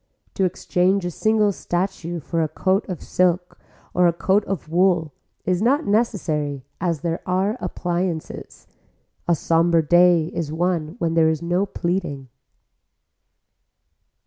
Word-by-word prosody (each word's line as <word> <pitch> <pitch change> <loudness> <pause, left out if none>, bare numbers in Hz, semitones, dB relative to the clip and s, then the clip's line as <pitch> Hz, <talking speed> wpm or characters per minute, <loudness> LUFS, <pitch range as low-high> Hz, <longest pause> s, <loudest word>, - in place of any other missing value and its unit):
To 190 - +1
exchange 185 +1 +1
a 175 - -2
single 215 +3 +2
statue 175 -2 -3
for 165 +3 -2
a 160 - +1
coat 190 +6 0
of 180 - -5
silk 180 0 0 0.3
and 180 0 +4
a - - +4
coat 190 +4 +1
of 195 -6 -4
wool 170 -2 +2 0.3
is 180 0 +1
not 275 +7 +2
necessary 155 - -1 0.2
as 170 -5 -1
there 170 0 -2
are 190 +4 +1
appliances. 175 -2 -4 0.6
A 170 - +4
somber 165 +1 +2
day 175 0 +5
is 155 -3 -3
one 165 -1 -1
when 165 -7 -1
there 165 -1 +4
is 160 +1 -2
no 175 +4 0
pleading. 170 -8 -3
175 Hz, 135 wpm, -22 LUFS, 165-190 Hz, 0.6 s, day